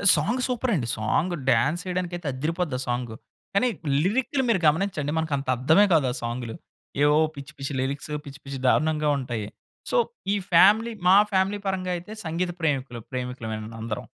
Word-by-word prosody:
Song 220 +13 0
super 250 0 0
అండి! 120 -8 -1
Song 130 +11 0 0.2
dance 145 +9 +2
ఏయడానికైతే 175 -2 -3
అద్దిరిపోద్ది 155 +1 -2
ఆ - - -3
song! 120 -2 -2 0.4
కానీ 250 +6 +4 0.4
లిరిక్‌లు 260 +7 +1
మీరు 215 -5 +3
గమనించండి 155 -2 +1
మనకంత 145 -4 -1
అర్థమే 160 +11 +5
కాదు 150 -5 +4
ఆ - - -4
సాంగులు! 120 -1 -4 0.5
ఏవో 150 +1 +5 0.2
పిచ్చి 140 -1 -9
పిచ్చి 135 0 -4
లిరిక్సు, 140 +3 -3
పిచ్చి 140 0 -10
పిచ్చి 135 -1 -5
దారుణంగా 155 +2 +2
ఉంటాయి! 120 -5 -4 0.4
సో, - - +2 0.4
ఈ - - +2 0.2
ఫ్యామిలీ 210 +7 +6 0.2
మా 190 - +8 0.2
ఫ్యామిలీ 195 +2 +1
పరంగా 185 -1 -1
అయితే 175 +4 -10
సంగీత 175 +2 -1
ప్రేమికులు 135 -6 -1
ప్రేమికులమే 125 -4 -4 0.2
అందరం. 110 -2 -4
150 Hz, 155 wpm, -25 LUFS, 130-185 Hz, 0.5 s, మా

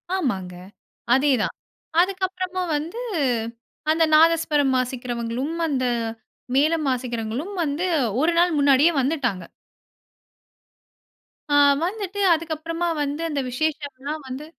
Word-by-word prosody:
ஆமாங்க, 190 - -2 0.6
அதே 275 +3 +3
தான். - - -1 0.5
அதுக்கு 380 0 -1
அப்பறமா 370 0 -4
வந்து, 335 +11 -5 0.9
அந்த 325 +1 +3
நாதஸ்வரம் 310 -4 +4
வாசிக்கிறவங்களும், 250 +3 -3
அந்த 265 -4 0 0.7
மேளம் 310 +2 +2
வாசிக்கிறவங்களும் 245 - -3
வந்து 310 +4 -1 0.4
ஒரு 325 +3 +3
நாள் 350 0 +4
முன்னாடியே 285 +3 +5
வந்துட்டாங்க. 250 - -1 2.1
ஆ - - +5 0.3
வந்துட்டு, 400 +1 -3
அதுக்கப்பறமா 330 +1 -3
வந்து 290 +2 -2
அந்த 295 - -2
விசேஷம்லாம் 290 +1 -3
வந்து 260 +3 -6
295 Hz, 100 wpm, -23 LUFS, 255-330 Hz, 2.1 s, முன்னாடியே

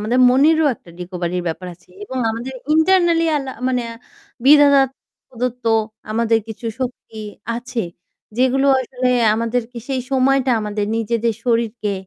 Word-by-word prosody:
আমাদের 235 +5 +1
মনেরও 305 +4 +4
একটা 175 - -18
রিকভারির 180 0 -3
ব্যাপার 175 +3 -5
আছে 175 - -28 0.2
এবং 260 -10 -5
আমাদের 240 +4 -5 0.2
internally 340 0 +3
আল্লা 270 -2 -3 0.2
মানে 250 -1 0 0.6
বিধাতা 285 0 +7 0.5
প্রদত্ত 250 0 -4 0.5
আমাদের 225 +1 +2
কিছু 225 +1 -7
শক্তি 245 -3 -5 0.4
আছে, 240 0 -4 0.6
যেগুলো 260 +2 +2
আসলে 255 0 -2 0.3
আমাদেরকে 230 +2 -2
সেই 265 -2 -1
সময়টা 270 0 +2
আমাদের 210 -1 -2
নিজেদের 230 0 0
শরীরকে, 230 -3 0
245 Hz, 125 wpm, -19 LUFS, 225-270 Hz, 0.6 s, বিধাতা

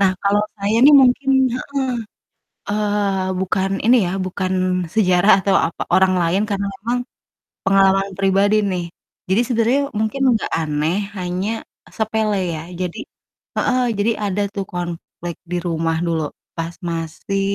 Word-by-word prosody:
nah, 190 -2 +4
kalau 205 +1 +3
saya 205 +2 0
nih 295 - +8
mungkin 265 +2 +3 0.2
heeh, 280 +2 -7 0.9
eee, 205 -2 0
bukan 190 +1 0
ini 240 +3 +6
ya, - - -2
bukan 185 0 -2 0.4
sejarah 185 -2 +4
atau 195 -1 +2
apa, 165 - -5
orang 190 0 +5
lain 170 +4 +1
karena 200 -1 -1
memang 235 +5 -2 0.7
pengalaman 195 0 +3
pribadi 195 +2 +3
nih. 185 -3 -1 0.5
Jadi 195 +5 +3
sebenernya 240 +3 +2
mungkin 220 +6 -1
gak 220 - -3
aneh 155 +2 0 0.2
hanya 180 +2 -2 0.5
sepele 220 -1 0 0.2
ya. 155 - -5 0.2
Jadi 180 -2 -3 0.6
heeh. 255 - +1 0.2
Jadi 205 +3 +2
ada 205 -1 -1
tuh 200 -2 -4
konflik 175 -1 -6 0.2
di 180 - 0
rumah 165 -1 0
dulu, 165 -2 0 0.3
pas 165 +1 -4
masih 165 +4 -3
195 Hz, 135 wpm, -20 LUFS, 180-210 Hz, 0.9 s, nih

